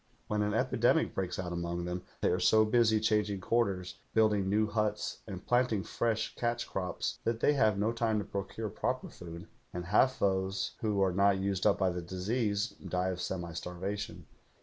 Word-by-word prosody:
When 105 0 -1
an 105 0 0
epidemic 130 +5 +2
breaks 90 -2 -2
out 90 -1 -3
among 85 0 -3
them 90 +1 -3 0.2
they - - +3
are 90 - +1
so 110 +4 +5
busy 110 -1 +4
changing 105 -2 +1
quarters, 95 -3 0 0.2
building 105 -3 +3
new 105 +2 +3
huts, 105 0 -1
and 95 -3 -7
planting 120 -5 +2
fresh 110 -2 -1
catch 120 0 -1
crops 90 -1 -3
that 115 -1 0
they 145 - +4
have 110 -7 +3
no 105 +3 +1
time 115 -2 0
to 105 - -2
procure 100 +2 -4
proper 130 +5 -2
food, 85 +1 -9 0.3
and 90 -2 -5
half 130 +8 +3
those 95 0 0
who 105 -3 +1
are 95 -2 +2
not 100 +1 +4
used 95 -1 0
up - - +4
by 95 -1 +2
the 90 0 -4
disease 100 +5 -1 0.2
die 90 +1 0
of 90 -1 -3
semi 85 -3 -3
starvation. 95 +5 -5
100 Hz, 185 wpm, -32 LUFS, 90-110 Hz, 0.3 s, so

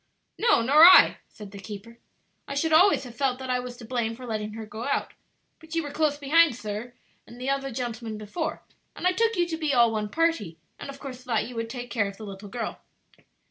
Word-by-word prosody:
"No, 450 - +4
nor 290 +6 +6
I," 365 +2 +9
said 210 -2 -12
the 200 - -10
keeper. 210 +3 -10 0.5
"I 280 - -5
should 320 +3 0
always 365 +2 +5
have 245 -3 -10
felt 265 -2 0
that 260 -1 -5
I 250 - +1
was 245 -1 -7
to 235 - -11
blame 230 -1 -2
for 250 +2 -10
letting 215 -2 -4
her 220 0 -7
go 215 +2 -8
out; 280 - -1 0.5
but 320 0 -10
you 330 - 0
were 290 - -6
close 300 -1 0
behind, 295 0 +4
sir, 215 +1 -6 0.3
and 240 - -13
the 260 +2 -1
other 275 0 -2
gentleman 235 -3 -5
before, 215 - -4 0.3
and - - -6
I 365 - +4
took 455 +4 +1
you 350 -2 +1
to 325 -2 -3
be 305 -4 0
all 235 -2 +5
one 215 -1 -2
party, 280 - 0 0.2
and - - -8
of 275 0 -9
course 255 -3 -8
thought 230 -4 -1
you 250 - -9
would 230 0 -3
take 245 0 -7
care 215 -4 +1
of 200 0 -9
the 220 - -9
little 200 0 -9
girl." 235 +1 -5
250 Hz, 235 wpm, -26 LUFS, 220-290 Hz, 0.5 s, I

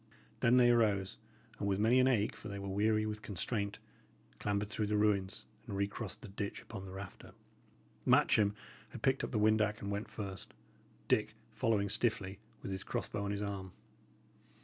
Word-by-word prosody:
Then 120 +2 +5
they 120 -1 +7
arose, 105 -5 +2 0.4
and 100 - -1
with 100 -1 +2
many 115 +5 +4
an 130 - +5
ache, 115 -5 +2
for - - -9
they 100 -1 -5
were 100 0 -5
weary 110 +2 +2
with 105 0 -4
constraint, 100 +1 -2 0.6
clambered 105 0 0
through 105 - 0
the 105 0 +1
ruins, 100 -2 +1 0.2
and 100 - -3
recrossed 100 +2 -3
the - - -7
ditch 100 +1 -4
upon 95 - -8
the 95 - -8
rafter. 95 0 -9 0.7
Matcham 100 -1 +4 0.3
had - - -9
picked 130 0 +3
up - - -1
the 115 - -1
windac 110 0 +3
and 100 - -4
went 100 +2 -3
first, 100 -3 -7 0.5
Dick - - +2 0.2
following 105 -3 +2
stiffly, 100 -2 -1 0.2
with - - -4
his 95 - -3
cross - - -2
bow 105 -1 -3
on - - -2
his 100 0 -2
arm. 95 -2 -4
105 Hz, 180 wpm, -34 LUFS, 100-110 Hz, 0.7 s, they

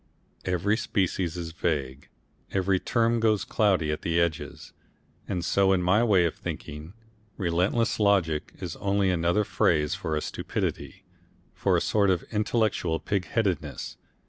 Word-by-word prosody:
Every 95 +4 +1
species 90 -5 -1
is 85 -2 -5
vague, 70 -5 -3 0.4
every 95 0 +1
term 115 +2 +1
goes 110 -2 +2
cloudy 95 -8 +2
at 75 - -4
its 85 0 +1
edges, 85 -2 -2 0.5
and 90 -3 -2
so 95 -1 +3
in 90 -1 +1
my 100 +6 +3
way 100 -7 +4
of 85 - 0
thinking, 75 +4 -7 0.4
relentless 90 +7 +1
logic 95 -7 +2
is - - -5
only 100 -1 +1
another 85 +4 +2
phrase 75 -6 +1
for 80 - -2
a 75 - -1
stupidity, - - -4 0.5
for - - +1
a - - 0
sort 100 -2 +2
of 90 -2 +1
intellectual 105 -6 0
pigheadedness. 100 -1 -2
95 Hz, 140 wpm, -27 LUFS, 85-105 Hz, 0.5 s, way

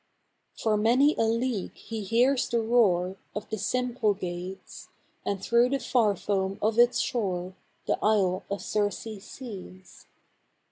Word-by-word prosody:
For 215 -2 +1
many 250 +8 +4
a 225 - +2
league 230 -2 -1
he 225 -1 -6
hears 245 +6 +2
the 235 - +1
roar 195 -6 +2 0.2
Of 210 - -4
the 220 - -2
Symplegades; 200 -7 -2 0.3
And 195 -1 -3
through 235 +1 +4
the 275 +1 0
far 225 -6 +2
foam 195 -1 -1
of 220 +2 +1
its 240 +1 +5
shore 185 -6 -1 0.3
The - - 0
Isle 195 -4 +2
of 200 0 -3
Circe 210 0 -2
sees. 190 -7 -10
215 Hz, 135 wpm, -27 LUFS, 190-235 Hz, 0.3 s, its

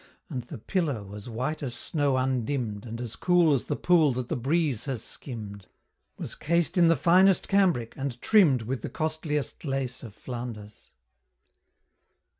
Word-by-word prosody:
And 125 - -2
the 140 - -8
pillow, 115 - -2
as 105 +3 -8
white 130 +8 -3
as 125 -4 -3
snow 145 0 0
undimm'd 125 -4 -1
And 115 +1 -6
as 120 -2 -5
cool 175 -4 +4
as 135 - 0
the - - -1
pool 165 -5 +4
that 125 0 -4
the - - 0
breeze 140 -1 0
has 130 -5 -3
skimmed, 105 -7 -8 0.5
Was - - -5
cased 170 +1 0
in 175 -2 +5
the 165 - +5
finest 180 +6 +4
cambric, 180 - +2
and 135 -3 -4
trimm'd 155 - +4
With 125 +1 -3
the - - -5
costliest 155 -2 -3
lace 135 -4 -2
of 110 -4 -10
Flanders. 115 -4 -8
135 Hz, 160 wpm, -27 LUFS, 120-160 Hz, 0.5 s, in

